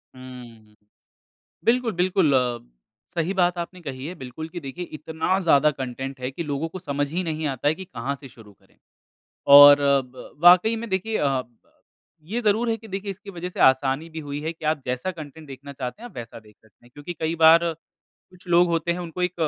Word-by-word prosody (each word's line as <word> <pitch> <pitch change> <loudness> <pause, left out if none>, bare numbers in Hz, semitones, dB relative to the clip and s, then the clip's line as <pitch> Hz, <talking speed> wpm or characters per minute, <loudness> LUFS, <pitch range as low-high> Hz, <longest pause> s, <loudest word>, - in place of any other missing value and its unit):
हम्म। 120 -4 -13 0.9
बिल्कुल, 240 0 +2
बिल्कुल 180 -3 +2
अ, 125 -2 +1 0.5
सही 170 +2 -1
बात 180 -2 +1
आपने 175 +1 -6
कही 135 -4 -7
है 180 - -7
बिल्कुल 135 +4 -8
कि 175 - -7
देखिए 165 +4 -7
इतना 160 +4 -1
ज़्यादा 155 -5 +4
कंटेंट 135 0 -6
है 125 0 -3
कि 170 - -5
लोगों 145 +1 -3
को 185 - -8
समझ 145 -4 -2
ही 180 +3 -2
नहीं 160 -2 -3
आता 135 0 -2
है 150 - +4
कि 190 - -9
कहाँ 130 -2 -4
से 135 0 -12
शुरू 110 -4 -16
करें। - - -30 0.8
और 145 0 +10
अ, 140 -1 +3
ब 125 0 -13
वाक़ई 180 +6 +7
में 230 +1 -6
देखिए 190 +4 -1
अ, 135 -3 0 0.8
ये 210 +10 -4
ज़रूर 225 +1 +1
है 225 - 0
कि 225 0 -14
देखिए 195 +1 -5
इसकी 200 +1 -9
वजह 180 -1 -6
से 180 - -8
आसानी 135 +4 +3
भी 160 0 -7
हुई 145 -1 -6
है 160 +2 -3
कि 160 - -14
आप 155 -2 0
जैसा 125 +8 -2
कंटेंट 155 -2 -10
देखना 140 +1 -10
चाहते 130 - -7
हैं 240 - -7
आप - - -21
वैसा 115 -1 -8
देख 105 -1 -21
सकते 110 0 -27
हैं - - -21
क्योंकि 145 +4 -7
कई 160 +1 -1
बार 165 +1 +7 0.7
कुछ 185 0 -20
लोग 175 +1 +4
होते 170 0 0
हैं 175 - -5
उनको 175 +1 -5
एक 180 0 0
160 Hz, 215 wpm, -24 LUFS, 135-180 Hz, 0.9 s, और